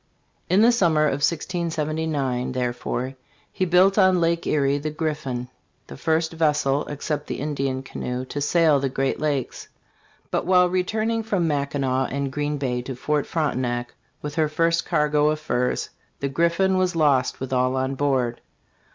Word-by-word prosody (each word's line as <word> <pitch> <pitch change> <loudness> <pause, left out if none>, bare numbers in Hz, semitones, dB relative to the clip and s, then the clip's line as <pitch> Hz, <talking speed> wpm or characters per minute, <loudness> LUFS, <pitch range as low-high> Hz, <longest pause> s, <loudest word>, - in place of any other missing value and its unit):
In 190 +5 +5
the 235 - +6
summer 165 -10 +3
of 145 -1 0
1679, 155 -5 -1
therefore, 125 +1 -2 0.4
he 190 - -1
built 185 +3 +4
on 185 -2 +5
Lake 170 0 0
Erie 140 -1 +2
the 155 +2 -3
Griffin, 150 -6 -3 0.4
the 70 - -10
first 160 - 0
vessel, 150 -3 +1
except 145 0 -4
the - - -4
Indian's 135 -2 -2
canoe, 125 0 -4
to 145 +2 -5
sail 155 -1 +3
the 135 0 -1
great 135 +1 -1
lakes; 145 -4 -2 0.6
but - - -1
while 180 -1 +5
re 185 0 +1
turning 225 +3 -1
from 200 -6 0
Mackinac 140 -3 0
and 140 -1 -2
Green 145 +1 -2
Bay 125 -3 -1
to 130 +1 -6
Fort 150 +3 -1
Frontenac 125 -6 -1 0.3
with 150 -1 -4
her 155 -1 +1
first 165 +2 +1
cargo 150 -2 +2
of 155 0 -1
furs, 125 -4 -1 0.3
the 140 - -2
Griffin 170 +6 +2
was 185 -1 +1
lost 140 -5 +2
with 130 0 -4
all 130 0 +2
on 130 +1 -1
board. 130 -4 0
150 Hz, 160 wpm, -23 LUFS, 135-165 Hz, 0.6 s, the